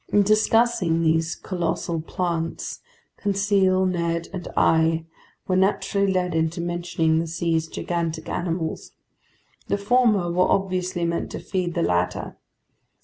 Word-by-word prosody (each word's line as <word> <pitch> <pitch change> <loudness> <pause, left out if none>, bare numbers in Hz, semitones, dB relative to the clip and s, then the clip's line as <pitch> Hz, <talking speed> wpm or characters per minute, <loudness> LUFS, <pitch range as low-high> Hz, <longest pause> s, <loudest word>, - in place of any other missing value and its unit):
In 205 - +5
discussing 215 -5 +3
these 160 +1 +1
colossal 170 -2 -2
plants, 165 0 -3 0.4
Conseil, 195 -2 +2
Ned, 170 -2 -1
and 180 -3 -5
I 160 0 +3 0.4
were 185 - +1
naturally 200 +1 +2
led 180 -2 0
into 160 +1 0
mentioning 170 -2 0
the 165 - -2
sea's 165 0 -1
gigantic 165 -1 -3
animals. 170 -2 -3 0.7
The - - 0
former 210 -4 +2
were 180 +1 +2
obviously 185 -2 0
meant 170 0 -2
to - - -4
feed 175 0 -3
the 170 - +1
latter. 90 0 -1
175 Hz, 125 wpm, -24 LUFS, 165-190 Hz, 0.7 s, In